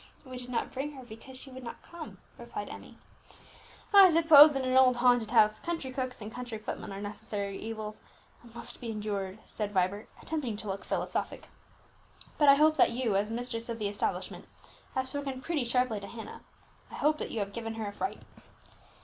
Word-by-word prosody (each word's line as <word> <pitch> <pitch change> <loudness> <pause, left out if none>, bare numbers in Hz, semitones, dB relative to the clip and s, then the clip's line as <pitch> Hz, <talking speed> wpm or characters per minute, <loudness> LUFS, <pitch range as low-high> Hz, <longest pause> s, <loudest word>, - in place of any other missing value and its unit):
"We 255 -1 -8
did 250 0 -9
not 245 - -2
bring 280 +3 -3
her, 265 -2 -10
because 240 +3 -11
she 265 +1 -10
would 260 0 -9
not 235 - -8
come," 340 -2 -10 0.2
replied - - -6
Emmie. - - -11 1.0
"I 395 -2 +10
suppose 315 -2 +9
that 270 -1 -1
in 255 - 0
an - - +2
old 260 -1 +6
haunted 245 -2 +3
house, 215 -2 +4
country 330 -6 -4
cooks 255 -2 -4
and 210 - -7
country 245 -3 -5
footmen 215 -1 -6
are 195 - -6
necessary 205 -1 -5
evils, 215 -1 -6 0.4
and 235 -1 -17
must 235 - -5
be 235 - -5
endured," 205 -3 -3
said 210 -2 -4
Vibert, 190 +2 0
attempting 275 -9 -3
to 215 - -7
look 195 0 -4
philosophic. - - -3 0.9
"But 295 -2 +6
I 275 - +9
hope 310 +2 +4
that - - +6
you, 235 -4 -1
as 205 +2 +1
mistress 230 0 -4
of 230 - -3
the 210 -2 -1
establishment, 200 0 -3 0.5
have 260 0 0
spoken 270 -1 -4
pretty 295 -1 -2
sharply 240 -2 +1
to 200 - -8
Hannah. 225 +2 -9 0.5
I - - -9
hope 305 +1 +2
that - - -3
you - - -5
have 200 -1 -2
given 225 0 -5
her 220 -1 -4
a 200 - -6
fright." 380 - -4
240 Hz, 200 wpm, -30 LUFS, 215-265 Hz, 1.0 s, I